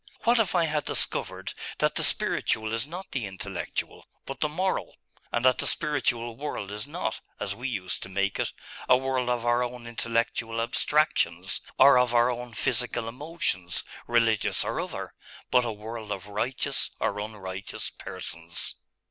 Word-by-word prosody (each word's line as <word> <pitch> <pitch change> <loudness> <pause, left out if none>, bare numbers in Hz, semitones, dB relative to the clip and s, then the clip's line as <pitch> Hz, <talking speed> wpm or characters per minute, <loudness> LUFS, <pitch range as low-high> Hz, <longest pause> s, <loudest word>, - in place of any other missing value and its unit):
What 235 0 +5
if 205 -4 +2
I 170 -2 +4
had 150 -2 0
discovered - - +1 0.2
that - - +2
the - - +2
spiritual 110 0 +2
is 115 +4 0
not 180 +4 -7
the 120 -6 -2
intellectual, 95 -1 -4 0.2
but 135 - -6
the 150 - +1
moral; 185 +5 -1 0.4
and 120 +1 +1
that 130 -1 +5
the - - +3
spiritual 120 -6 +1
world 115 -7 -4
is 105 +1 -3
not, - - -3 0.2
as 100 - -1
we 125 +6 -4
used 95 -6 -3
to - - -7
make 100 +1 0
it, - - 0 0.4
a 125 - +8
world 130 -1 0
of 120 -1 0
our 120 +1 +3
own 125 -1 -3
intellectual 115 0 -1
abstractions, 115 - +1 0.2
or 140 -2 +8
of 125 -1 +2
our 120 +1 +5
own 120 -1 -6
physical 125 -1 +2
emotions, 120 - -2 0.2
religious 115 -2 +3
or - - -1
other, - - -5 0.4
but 125 -1 +5
a 115 - -1
world 110 0 -7
of 100 0 -4
righteous 115 +5 0
or - - 0
unrighteous 95 -3 -5
persons? 85 0 -5
120 Hz, 165 wpm, -28 LUFS, 105-130 Hz, 0.4 s, a